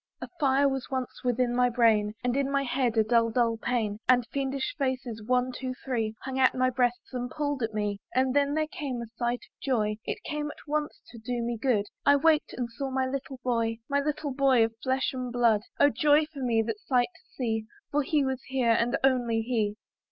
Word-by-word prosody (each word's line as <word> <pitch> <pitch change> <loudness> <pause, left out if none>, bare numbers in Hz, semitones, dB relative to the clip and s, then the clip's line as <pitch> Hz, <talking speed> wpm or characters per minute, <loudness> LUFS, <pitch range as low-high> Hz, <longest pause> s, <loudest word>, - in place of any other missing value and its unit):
A - - -6
fire 280 -1 +4
was 270 -1 -2
once 260 -2 -4
within 245 0 +1
my 250 0 +4
brain; 220 -3 +3
And 245 0 0
in 275 0 +1
my 275 0 +1
head 245 -3 0
a 220 - +6
dull, 230 +1 +3
dull 230 0 +1
pain; 225 -3 -1
And 250 -2 +5
fiendish 275 -1 -2
faces 260 -5 -2
one, 250 +2 +1
two, 255 0 -5
three, 225 -5 -1
Hung 265 0 -3
at 260 - +4
my 255 0 +2
breasts, 245 0 -1
and 245 -1 -3
pulled 290 -1 -2
at 220 -1 -2
me. 205 -1 -1 0.2
But 260 0 +2
then 285 +1 +2
there 310 0 +1
came 280 -5 -5
a 235 - -4
sight 240 0 -1
of - - -34
joy; 215 -6 0
It - - -4
came 300 -1 -3
at - - -12
once 300 0 -2
to 235 - -11
do 240 +1 -3
me 235 0 -1
good; 225 -3 +1 0.2
I 285 - +6
waked, 310 +1 +3
and 245 -1 -1
saw 270 +4 -4
my 265 0 0
little 265 0 -5
boy, 230 -2 0
My 280 0 +1
little 295 0 -2
boy 260 -4 +4
of 225 - -5
flesh 260 0 0
and 255 -1 -4
blood; 235 -3 +3 0.2
Oh 285 - +6
joy 295 +4 +4
for 280 - -7
me 230 -3 +2
that 220 -1 -4
sight 245 0 +1
to 330 - -21
see! 225 -4 -1 0.3
For 295 - +2
he 290 0 +1
was 265 -1 -2
here, 260 -3 +2
and 235 +1 +2
only 245 -4 +2
he. 220 -3 0
250 Hz, 220 wpm, -28 LUFS, 230-270 Hz, 0.3 s, a